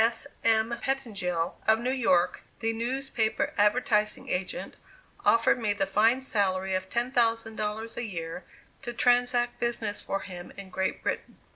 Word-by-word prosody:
S. 230 0 +1 0.2
M. 225 +1 +3
Pettengill, 195 -11 -1
of 220 0 +6
New 245 +3 -1
York, 185 -9 +2 0.2
the 225 -1 0
newspaper 235 -1 -1
advertising 210 0 +2
agent, 180 0 -2 0.5
offered 250 +3 +4
me 215 -3 +1
the 200 -1 0
fine 220 +6 +3
salary 190 -6 0
of 185 0 -2
$10,000 225 -2 0
a 240 - -2
year 170 -4 -5 0.4
to 240 -3 -5
transact 245 0 +2
business 230 -3 -2
for 195 - -2
him 180 -2 -8
in 195 -1 -9
Great 190 +1 -2
Britain. - - -3
225 Hz, 140 wpm, -28 LUFS, 195-240 Hz, 0.5 s, of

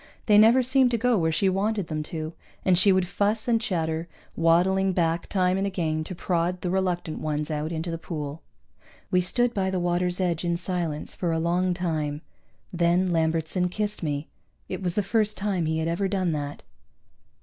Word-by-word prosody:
They 210 -2 +6
never 235 +4 +6
seemed 260 0 +3
to 235 - 0
go 245 +1 +2
where 160 -5 +1
she 190 +5 +1
wanted 200 +1 0
them 155 -2 -3
to, 160 0 -4 0.3
and 185 - +5
she 195 +3 +5
would 185 -1 +2
fuss 210 +4 0
and 230 -2 +2
chatter, 165 -5 -1 0.3
waddling 185 +3 +3
back 170 -1 0
time 185 -1 +1
and 195 - 0
again 160 -5 -1
to 185 - -6
prod 175 +1 -1
the 180 - -2
reluctant 180 -4 -1
ones 150 0 -2
out 155 +1 -2
into 165 +1 -3
the 165 - -4
pool. 150 -2 -5 0.7
We 180 -1 +4
stood 240 +7 +1
by 190 -2 0
the 190 -1 -1
water's 175 +1 0
edge 175 -3 0
in 170 -1 0
silence 175 -4 -3
for 175 -2 -2
a 165 - 0
long 175 +2 +1
time. 155 -4 -2 0.5
Then 175 +1 +2
Lambertson 165 +2 +1
kissed 210 +2 -3
me. 150 -2 -2 0.4
It 185 - -5
was 180 -2 -1
the 210 - +1
first 215 +1 +1
time 195 -5 -1
he 160 0 0
had 160 0 -1
ever 170 +4 0
done 185 -3 0
that. 145 -2 -4
180 Hz, 195 wpm, -26 LUFS, 165-195 Hz, 0.7 s, They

